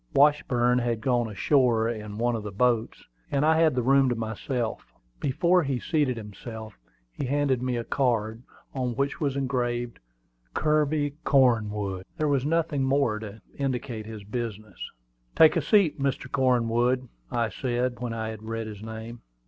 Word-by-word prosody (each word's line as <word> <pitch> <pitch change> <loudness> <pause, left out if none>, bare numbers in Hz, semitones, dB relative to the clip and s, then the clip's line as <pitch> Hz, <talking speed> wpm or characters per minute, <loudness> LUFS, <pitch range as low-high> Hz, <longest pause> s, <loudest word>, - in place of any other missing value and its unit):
Washburn 125 -4 +4
had 120 -2 -1
gone 120 0 +1
ashore 115 +2 +2
in 105 -3 -5
one 120 +1 +1
of 110 - -3
the 105 -1 -6
boats, 115 +2 0 0.2
and 140 +1 +1
I 160 +1 +4
had 160 -5 +4
the 125 - +1
room 135 +1 +4
to 120 - 0
myself. 115 +1 -3 0.3
Before 170 +6 +2
he 135 -5 -1
seated 145 -6 0
himself 110 +1 -8 0.4
he 130 - -4
handed 140 -2 +1
me 125 -1 -1
a 120 - -2
card, 115 -4 0 0.3
on 125 -3 -2
which 140 +3 -1
was 140 -3 0
engraved 120 -3 -2 0.6
"Kirby 150 -1 +1
Cornwood." 105 -8 +2
There 155 - +1
was 140 -1 +1
nothing 155 -4 +1
more 130 -5 +1
to 110 -1 -9
indicate 125 -5 -3
his 110 -2 -8
business. 110 -1 -6 0.6
"Take 160 -1 +7
a - - +2
seat, 200 -9 +3
Mr. 135 +1 -2
Cornwood," 125 -1 +2 0.2
I 115 -2 0
said, 120 +3 -2
when 120 -1 -3
I 110 -1 -3
had 110 -1 -7
read 115 0 -4
his 105 -2 -8
name. 110 +1 -8
120 Hz, 160 wpm, -26 LUFS, 110-140 Hz, 0.6 s, Take